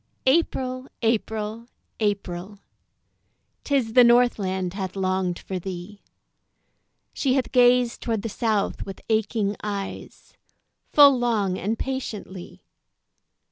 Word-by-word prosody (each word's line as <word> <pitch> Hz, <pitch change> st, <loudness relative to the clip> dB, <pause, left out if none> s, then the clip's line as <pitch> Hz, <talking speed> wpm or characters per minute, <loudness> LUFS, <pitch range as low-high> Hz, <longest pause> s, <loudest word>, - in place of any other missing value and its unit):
April! 260 Hz, -3 st, +1 dB, 0.2 s
April! 220 Hz, 0 st, -1 dB, 0.3 s
April! 200 Hz, -2 st, -2 dB, 1.1 s
'Tis 265 Hz, -6 st, 0 dB
the 250 Hz, -, +8 dB
Northland 200 Hz, -7 st, +2 dB
hath 190 Hz, -2 st, -5 dB
longed 185 Hz, -2 st, -1 dB
for 190 Hz, -1 st, -5 dB
thee, 185 Hz, +2 st, -8 dB, 1.1 s
She 265 Hz, -2 st, +1 dB
hath 265 Hz, -, -1 dB
gazed 245 Hz, -1 st, +4 dB
toward 225 Hz, -3 st, -2 dB
the -, -, -2 dB
South 215 Hz, -2 st, -1 dB
with 195 Hz, -, -8 dB
aching 215 Hz, -1 st, 0 dB
eyes 200 Hz, -2 st, -6 dB, 0.6 s
Full 285 Hz, -2 st, +8 dB
long 210 Hz, -6 st, 0 dB
and 220 Hz, +4 st, -2 dB
patiently. 215 Hz, -9 st, -6 dB
215 Hz, 100 wpm, -24 LUFS, 195-245 Hz, 1.1 s, the